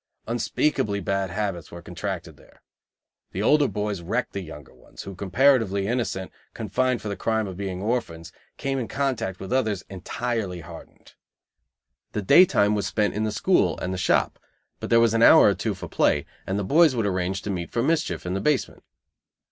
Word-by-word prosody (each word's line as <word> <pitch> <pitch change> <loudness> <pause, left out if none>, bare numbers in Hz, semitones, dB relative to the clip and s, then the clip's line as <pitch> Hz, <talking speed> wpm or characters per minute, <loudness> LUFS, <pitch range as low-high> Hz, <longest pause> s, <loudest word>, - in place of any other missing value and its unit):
Unspeakably 115 -2 0
bad 95 -1 -1
habits 95 -4 -3
were 85 0 -10
contracted 90 -2 -5
there. - - -22 0.7
The 95 - -2
older 145 +4 +4
boys 105 -3 -3
wrecked 110 +9 -2
the 100 - -3
younger 80 -5 -11
ones, - - -13
who, 95 - -8
comparatively 100 0 +2
innocent, 110 -5 -2 0.2
confined 130 -1 -1
for - - -4
the 100 - -3
crime 110 +3 0
of 95 -2 -6
being 95 -1 -4
orphans, 85 -9 -3 0.3
came 135 -1 -2
in 120 - -3
contact 115 -9 -2
with 95 +5 -5
others 110 -7 0
entirely 100 -1 -3
hardened. - - -13 1.0
The 105 - -2
day 180 - +7
time 105 - +2
was 105 -1 -1
spent 105 -2 0
in 110 +1 -1
the 110 - -1
school 105 - +2
and 90 - -3
the - - -3
shop, - - +1 0.4
but - - -6
there 115 - +5
was 115 -1 +3
an 115 - +2
hour - - +8
or - - +2
two - - -3
for - - -8
play, - - +1 0.2
and 95 +2 -1
the 100 - -1
boys 155 - +4
would 115 -3 0
arrange 95 0 -1
to 105 - -3
meet 85 -3 -4
for 115 - 0
mischief 160 - 0
in 90 - -2
the 95 - -2
basement. 150 -3 0
105 Hz, 190 wpm, -24 LUFS, 95-120 Hz, 1.0 s, hour